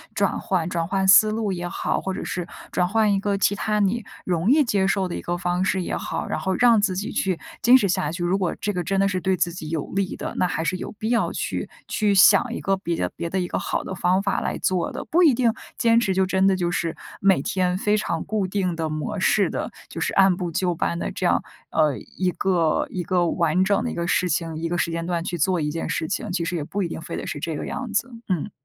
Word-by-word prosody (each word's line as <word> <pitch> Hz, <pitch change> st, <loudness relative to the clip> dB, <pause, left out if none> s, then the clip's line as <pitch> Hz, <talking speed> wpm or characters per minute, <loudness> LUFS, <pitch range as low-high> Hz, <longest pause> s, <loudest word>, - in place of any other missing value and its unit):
转 -, -, +1 dB
换 180 Hz, -4 st, -1 dB
转 165 Hz, -2 st, -1 dB
换 190 Hz, 0 st, 0 dB
思 215 Hz, +3 st, +7 dB
路 215 Hz, -2 st, -1 dB
也 175 Hz, -1 st, -3 dB
好， -, -, -1 dB
或 190 Hz, -, -3 dB
者 -, -, -5 dB
是 180 Hz, -1 st, -3 dB, 0.2 s
转 180 Hz, -, +1 dB
换 215 Hz, +1 st, +2 dB
一 195 Hz, -, +1 dB
个 200 Hz, 0 st, 0 dB
其 200 Hz, -, +2 dB
它 210 Hz, +1 st, 0 dB
你 210 Hz, +3 st, +1 dB, 0.2 s
容 175 Hz, +3 st, 0 dB
易 300 Hz, +2 st, +5 dB
接 200 Hz, -6 st, +1 dB
受 190 Hz, -1 st, +1 dB
的 175 Hz, -, -5 dB
一 -, -, -4 dB
个 175 Hz, 0 st, -2 dB
方 175 Hz, +1 st, -1 dB
式 190 Hz, -1 st, 0 dB
也 -, -, -3 dB
好， -, -, -3 dB
然 -, -, -2 dB
后 190 Hz, 0 st, -1 dB
让 235 Hz, -2 st, +5 dB
自 195 Hz, -3 st, +1 dB
己 210 Hz, +7 st, -3 dB
去 185 Hz, -3 st, -1 dB, 0.2 s
坚 245 Hz, +3 st, +7 dB
持 205 Hz, -6 st, +1 dB
下 155 Hz, -4 st, 0 dB
去。 175 Hz, 0 st, -4 dB
如 180 Hz, +3 st, +1 dB
果 180 Hz, -3 st, -1 dB
这 205 Hz, 0 st, -1 dB
个 180 Hz, -1 st, -2 dB
真 195 Hz, +2 st, 0 dB
的 195 Hz, -, +4 dB
是 185 Hz, -1 st, -1 dB
对 185 Hz, +1 st, +1 dB
自 175 Hz, -, +1 dB
己 155 Hz, -3 st, -7 dB
有 160 Hz, -3 st, -2 dB
利 195 Hz, -2 st, -1 dB
的， -, -, -5 dB
那 180 Hz, -, +2 dB
还 160 Hz, -2 st, -2 dB
是 165 Hz, +3 st, -1 dB
有 -, -, -6 dB
必 215 Hz, +1 st, -4 dB
要 235 Hz, -1 st, +1 dB
去 -, -, -3 dB, 0.2 s
去 210 Hz, -2 st, +1 dB
想 235 Hz, +5 st, +6 dB
一 -, -, -4 dB
个 195 Hz, 0 st, 0 dB
别 170 Hz, -3 st, -2 dB
的 -, -, -2 dB
别 170 Hz, -, -4 dB
的 190 Hz, -, -1 dB
一 180 Hz, -, -1 dB
个 -, -, -2 dB
好 -, -, -2 dB
的 -, -, -5 dB
方 185 Hz, +1 st, +1 dB
法 200 Hz, -, 0 dB
来 -, -, -2 dB
做 185 Hz, -2 st, 0 dB
的。 -, -, -6 dB
不 350 Hz, +3 st, +2 dB
一 305 Hz, -7 st, +6 dB
定 235 Hz, -3 st, +2 dB, 0.2 s
坚 230 Hz, 0 st, +4 dB
持 205 Hz, -5 st, +1 dB
就 190 Hz, 0 st, +3 dB
真 190 Hz, +1 st, +2 dB
的 195 Hz, -, +4 dB
就 175 Hz, -2 st, -1 dB
是 165 Hz, -2 st, -2 dB, 0.2 s
每 195 Hz, -7 st, +4 dB
天 180 Hz, -1 st, 0 dB
非 210 Hz, +2 st, +1 dB
常 170 Hz, -6 st, -2 dB
固 205 Hz, -3 st, -1 dB
定 185 Hz, -2 st, -1 dB
的 160 Hz, -1 st, -2 dB
模 155 Hz, +7 st, -3 dB
式 200 Hz, +1 st, +3 dB
的， -, -, -3 dB, 0.2 s
就 -, -, -7 dB
是 -, -, -1 dB
按 190 Hz, -2 st, +5 dB
部 175 Hz, -1 st, -4 dB
就 175 Hz, +2 st, 0 dB
班 170 Hz, +1 st, -1 dB
地 -, -, -3 dB
这 -, -, -3 dB
样 -, -, +2 dB, 0.3 s
呃， 150 Hz, -3 st, +2 dB
一 185 Hz, -1 st, -3 dB
个 170 Hz, -3 st, +1 dB
一 185 Hz, -, -3 dB
个 175 Hz, -1 st, +1 dB
完 170 Hz, +1 st, +2 dB
整 200 Hz, +4 st, +1 dB
的 245 Hz, -, -2 dB
一 -, -, -5 dB
个 170 Hz, 0 st, -2 dB
事 180 Hz, 0 st, +1 dB
情 165 Hz, 0 st, -1 dB
一 165 Hz, -, -2 dB
个 175 Hz, -, -1 dB
时 170 Hz, -, 0 dB
间 165 Hz, 0 st, -3 dB
段 170 Hz, -1 st, -1 dB
去 175 Hz, -1 st, -3 dB
做 180 Hz, +2 st, +1 dB
一 150 Hz, -1 st, -1 dB
件 165 Hz, -, -4 dB
事 160 Hz, -, -1 dB
情， 210 Hz, +1 st, -3 dB
其 175 Hz, -2 st, -1 dB
实 180 Hz, -, -2 dB
也 160 Hz, -, -2 dB
不 200 Hz, +6 st, -3 dB
一 -, -, -1 dB
定 165 Hz, -, -6 dB
非 -, -, -6 dB
得 -, -, -5 dB
是 -, -, -4 dB
这 160 Hz, +1 st, -3 dB
个 -, -, -4 dB
样 255 Hz, -2 st, -5 dB
子， 260 Hz, -, 0 dB, 0.2 s
嗯。 180 Hz, -6 st, -1 dB
185 Hz, 295 characters per minute, -23 LUFS, 170-200 Hz, 0.3 s, 思